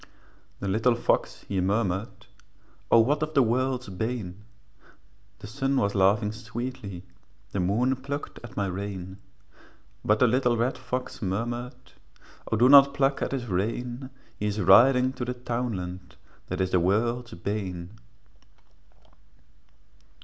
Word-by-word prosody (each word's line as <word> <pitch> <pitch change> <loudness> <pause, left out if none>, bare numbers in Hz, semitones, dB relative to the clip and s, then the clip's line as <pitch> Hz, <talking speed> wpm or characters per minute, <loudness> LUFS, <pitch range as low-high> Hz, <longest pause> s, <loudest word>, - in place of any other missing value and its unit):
The 100 - -2
little 110 +5 +2
fox 120 - -1
he 95 -2 -1
murmured, 100 +1 -1 0.6
'O 115 - +7
what 145 +6 +1
is 155 0 -2
the 135 - +6
world's 125 +2 0
bane?' 105 -1 -4 0.9
The - - -11
sun 135 +5 -1
was 100 -4 +1
laughing 105 +2 +3
sweetly, 115 -4 -6 0.5
The 100 - -2
moon 115 +9 +1
plucked 140 +3 -6
at 120 - -11
my 100 - +1
rein; 95 0 -5 0.8
But 105 - +3
the 125 - +4
little 125 0 +2
red 120 +3 0
fox 125 0 -5
murmured, 120 +5 -4 0.6
'O 110 - +2
do 120 +3 +5
not 140 0 +8
pluck 135 -1 +1
at - - -1
his 135 -3 -3
rein, 120 +6 -3 0.3
He 105 - -1
is 105 +1 -2
riding 125 +7 +6
to 125 - -5
the 125 +1 -3
townland 110 -8 -4 0.3
That 90 +1 -3
is 95 0 0
the 90 - +4
world's 115 +6 0
bane.' 90 -2 -4
115 Hz, 135 wpm, -26 LUFS, 100-125 Hz, 0.9 s, not